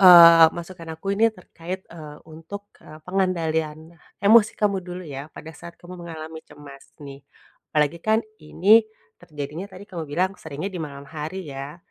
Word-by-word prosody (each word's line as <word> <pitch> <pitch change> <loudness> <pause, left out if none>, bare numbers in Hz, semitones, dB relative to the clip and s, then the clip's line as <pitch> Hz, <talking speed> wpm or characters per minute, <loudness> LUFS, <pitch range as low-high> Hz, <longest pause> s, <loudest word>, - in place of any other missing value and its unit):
eee, 170 -3 +10
masukan 170 -1 -8
aku 195 +4 -3
ini 225 +2 +5
terkait, 185 0 -8
eee, 150 -3 -10
untuk, 185 +6 -10
eee, 155 - -12
pengendalian 160 -4 -1 0.3
emosi 220 +1 +7
kamu 200 -2 +2
dulu 180 0 -7
ya 140 +1 -7
pada 160 - -9
saat 170 0 -11
kamu 180 +1 -10
mengalami 160 -1 -8
cemas 140 -2 -14
nih, 140 -1 -9 0.5
apalagi 150 +1 +2
kan 220 +1 +3 0.2
ini 200 +8 +5 0.4
terjadinya 155 +1 -6
tadi 185 +2 -11
kamu 170 -3 -5
bilang 180 +6 0
seringnya 160 +6 -5
di 180 - -5
malam 140 -2 -8
hari 160 +5 -5
ya, 140 +3 -7
165 Hz, 155 wpm, -24 LUFS, 150-185 Hz, 0.5 s, eee